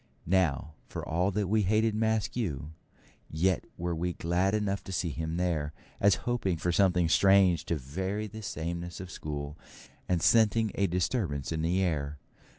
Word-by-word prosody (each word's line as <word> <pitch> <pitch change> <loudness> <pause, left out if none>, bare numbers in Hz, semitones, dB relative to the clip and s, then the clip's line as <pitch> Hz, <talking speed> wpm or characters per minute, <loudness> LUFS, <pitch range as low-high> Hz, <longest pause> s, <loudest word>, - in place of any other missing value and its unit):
Now, 80 -5 +1
for - - -6
all 90 +4 +1
that 100 0 -1
we 110 +3 +2
hated 110 +3 +2
Maskew, 110 - -1 0.6
yet 90 +3 +1
were 85 0 -2
we 90 +2 -2
glad 90 +5 +1
enough 100 -2 -1
to - - -7
see 90 -2 -1
him 80 +3 -3
there, 80 -5 -1 0.3
as 100 0 +5
hoping 115 -8 0
for 90 +2 0
something 90 -2 +3
strange 95 -2 +4
to 85 - 0
vary 95 +10 -3
the 110 +1 -8
sameness 85 -2 -4
of 95 -1 -7
school, 75 -1 -5 0.5
and 90 -2 +2
scenting 110 +2 +4
a 100 - +1
disturbance 85 - -1
in 80 -1 -1
the 90 +4 +1
air. 75 -4 -1
90 Hz, 160 wpm, -29 LUFS, 80-100 Hz, 0.6 s, as